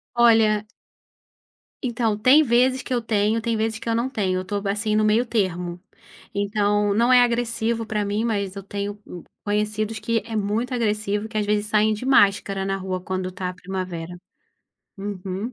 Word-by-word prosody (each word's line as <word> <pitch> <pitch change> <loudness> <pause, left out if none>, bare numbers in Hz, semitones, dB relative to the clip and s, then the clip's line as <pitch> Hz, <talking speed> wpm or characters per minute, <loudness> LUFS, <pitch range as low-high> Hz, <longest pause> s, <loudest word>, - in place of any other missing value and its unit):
Olha 220 -3 +4 1.2
Então, 230 -3 0
tem 255 +8 +6
vezes 255 +1 +2
que 255 - -4
eu 240 - +1
tenho, 220 0 +1
tem 230 -1 -1
vezes 220 0 -1
que 230 - -5
eu 225 - +1
não 235 +3 0
tenho. 190 -7 -1
Eu - - -9
tô 200 +1 -3
assim 210 +2 0
no 215 - +3
meio 220 +4 +3
termo. 180 -6 -2 0.5
Então, 205 0 +1
não 235 +4 +3
é 250 - +8
agressivo 235 -1 0
pra 210 -1 -1
mim 205 +2 -1
mas 200 -4 -2
eu 195 - -7
tenho, 205 +1 -5
hum, 175 - -9 0.2
conhecidos 210 +1 -1
que 230 -1 0
é 225 -1 -6
muito 215 +5 -1
agressivo, 215 -2 -1
que 215 - -4
às 210 - +1
vezes 210 0 +1
saem 215 0 +3
de 215 +5 -5
máscara 200 -6 +3
na 195 0 -1
rua 185 -1 -4
quando 185 0 -3
tá 185 0 -4
a - - -6
primavera. 180 -2 -5 0.8
Uhum. 195 +3 -5
210 Hz, 180 wpm, -23 LUFS, 200-230 Hz, 1.2 s, é